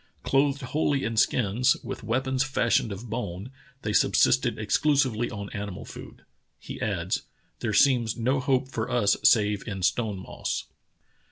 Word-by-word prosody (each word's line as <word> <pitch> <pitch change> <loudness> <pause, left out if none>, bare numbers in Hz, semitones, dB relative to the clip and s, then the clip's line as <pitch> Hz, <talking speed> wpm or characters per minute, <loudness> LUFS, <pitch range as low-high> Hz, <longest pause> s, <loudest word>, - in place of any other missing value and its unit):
Clothed 140 0 +1
wholly 140 +1 0
in 115 0 -2
skins, 120 +3 +2
with - - -6
weapons 130 +4 0
fashioned 120 -5 +1
of 100 +5 -7
bone, 110 -1 -5 0.3
they 105 - -2
subsisted - - +3
exclusively 120 +2 +1
on 100 -3 -7
animal 100 -3 -6
food. - - -11 0.3
[He - - -9
adds:] - - -1 0.4
There 110 - -2
seems 120 0 +3
no 130 +4 +1
hope 130 0 +1
for 115 -4 -4
us 105 -5 +3
save 105 -3 +3
in 95 -4 -5
stone 105 +1 0
moss." 95 - -4
115 Hz, 145 wpm, -26 LUFS, 105-130 Hz, 0.4 s, subsisted